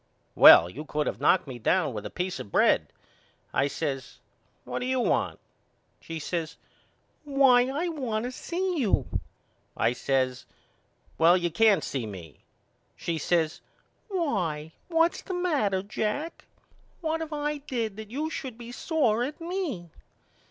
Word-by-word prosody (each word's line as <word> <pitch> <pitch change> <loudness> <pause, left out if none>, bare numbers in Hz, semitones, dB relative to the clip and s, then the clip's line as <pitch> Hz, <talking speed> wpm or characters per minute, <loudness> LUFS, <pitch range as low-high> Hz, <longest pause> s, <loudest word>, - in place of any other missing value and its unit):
Well, 85 - +9
you 130 +12 -7
could 150 -1 -2
of - - -3
knocked 185 - +4
me 130 -4 -8
down 155 +3 +1
with 105 -2 -5
a - - -9
peace 180 0 -3
of 100 - -8
bread. - - +3 0.7
I 135 - +2
says 140 -2 -4 0.5
What - - -4
do 250 - -3
you 260 0 +1
want? - - 0 0.6
She 165 - -7
says 160 +1 -3 0.7
Why 270 -4 +5
I 300 +6 -1
want 245 -9 -2
to 250 - -3
see 355 +5 -2
you. 220 -8 +2 0.7
I 115 - +2
says 130 0 -1 0.7
Well 170 +2 +6
you 175 -1 -1
can't 200 -1 +4
see 125 -5 -3
me. 90 -7 -10 0.6
She 165 -1 -3
says 160 0 0 0.5
Why 175 - -1 0.2
what's 330 0 +2
the 370 - -5
matter, 275 - +1
Jack? 220 +10 -3 0.6
What 325 0 -1
have 320 -1 -5
I 295 0 -2
did 235 -7 -3
that 220 -1 -8
you 300 +7 -3
should 255 -7 -5
be 240 0 -9
sore 245 -5 +1
at 285 +4 -5
me? 330 - -4
220 Hz, 150 wpm, -27 LUFS, -, 0.7 s, Well